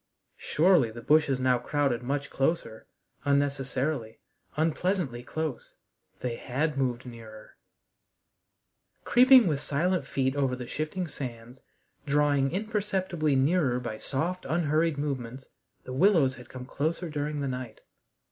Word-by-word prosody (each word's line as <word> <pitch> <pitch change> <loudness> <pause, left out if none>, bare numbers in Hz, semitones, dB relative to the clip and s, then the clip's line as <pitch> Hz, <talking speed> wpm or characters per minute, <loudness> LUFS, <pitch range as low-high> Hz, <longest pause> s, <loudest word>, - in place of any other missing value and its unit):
Surely 165 -6 +3
the 115 +2 -9
bushes 145 -2 +3
now 130 -1 +2
crowded 140 -5 0
much 140 +3 -3
closer 135 -6 -1 0.4
unnecessarily, 140 -3 -1 0.4
unpleasantly 160 -4 0
close. 155 +2 -5 0.5
They 120 -2 -3
had 150 +5 -1
moved 125 -2 -1
nearer. 115 -3 -11 1.5
Creeping 255 -1 +7
with 150 -5 0
silent 155 +1 0
feet 130 0 0
over 135 -3 +1
the 125 -1 -7
shifting 155 +7 -3
sands, 125 -3 -8 0.5
drawing 145 -1 +2
imperceptibly 190 -6 -1
nearer 135 -2 +2
by 115 -3 -5
soft, 170 +10 -2
unhurried 160 -1 +1
movements, 130 -3 -4 0.4
the 130 - -7
willows 155 -3 +4
had 125 -2 -13
come 125 -1 -8
closer 160 +6 -2
during 150 -1 -3
the 140 - -1
night. 125 -4 -6
140 Hz, 120 wpm, -28 LUFS, 125-160 Hz, 1.5 s, Creeping